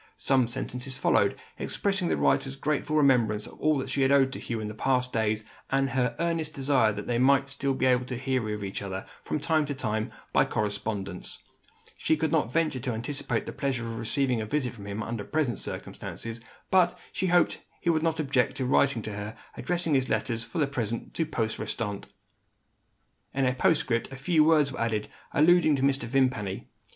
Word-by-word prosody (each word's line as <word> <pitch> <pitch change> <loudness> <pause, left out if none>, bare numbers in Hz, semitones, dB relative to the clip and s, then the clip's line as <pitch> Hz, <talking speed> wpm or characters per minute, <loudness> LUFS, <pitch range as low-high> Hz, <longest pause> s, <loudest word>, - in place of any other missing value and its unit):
Some 130 -3 +3
sentences 125 +1 -4
followed, - - +2 0.2
expressing 195 -3 0
the - - +1
writer's 135 -1 +2
grateful 150 +1 -1
remembrance 120 -8 +3
of - - -11
all 155 -1 +3
that 130 0 -3
she 140 - 0
had 135 0 +4
owed 135 -1 +4
to - - -5
Hugh 115 -2 -3
in 105 0 -4
past 125 +1 +1
days, 110 -1 +1 0.3
and 135 0 +1
her 125 -1 +1
earnest 165 -2 -1
desire 135 -5 +3
that 105 0 -5
they 120 -1 0
might 135 +1 +4
still 135 -1 -1
hear 130 -1 +4 0.6
of 105 - -6
each 95 -1 -4
other, 95 -1 -5 0.2
from 150 - -2
time 155 +1 +2
to 145 - -3
time, 110 -3 -2 0.2
by - - +5
correspondence. 100 -2 -3 0.5
She 160 - +1
could 155 0 0
not 150 -7 +1
venture 160 -4 +1
to 125 0 -2
anticipate 125 +6 -2
the - - -6
pleasure 130 -4 -2
of 115 -1 -5
receiving 125 +1 0
a 110 - -4
visit 135 -1 -1
from 100 -4 -10
him, 100 +2 -3
under 115 -2 -4
present 140 -3 0
circumstances. 115 0 -5 0.3
But, 180 -2 +4 0.2
she 190 - 0
hoped 175 0 +4
that - - -24 0.2
he 170 - +3
would 160 -1 +1
not 160 0 0
object 135 -3 +1
to 130 -1 -2
write 135 +2 +4
to 110 - -5
her, 105 +2 -6 0.2
addressing 175 -3 -1
his 130 -1 +2
letters, 115 -3 0
for 175 - -8
the 150 - +3
present, 120 -5 -3
to 165 - -1
post 115 -7 -2
restante. 105 -4 -3 1.3
In 135 -1 +2
a 125 - +2
postscript 125 -3 +1
a - - -6
few 155 +4 +3
words 150 -3 +4
were 125 - -5
added, 110 -2 -1 0.2
alluding 155 0 +5
to 135 - -1
Mr. 135 -3 +2
Vimpany. 115 -6 0
130 Hz, 195 wpm, -28 LUFS, 115-150 Hz, 1.3 s, by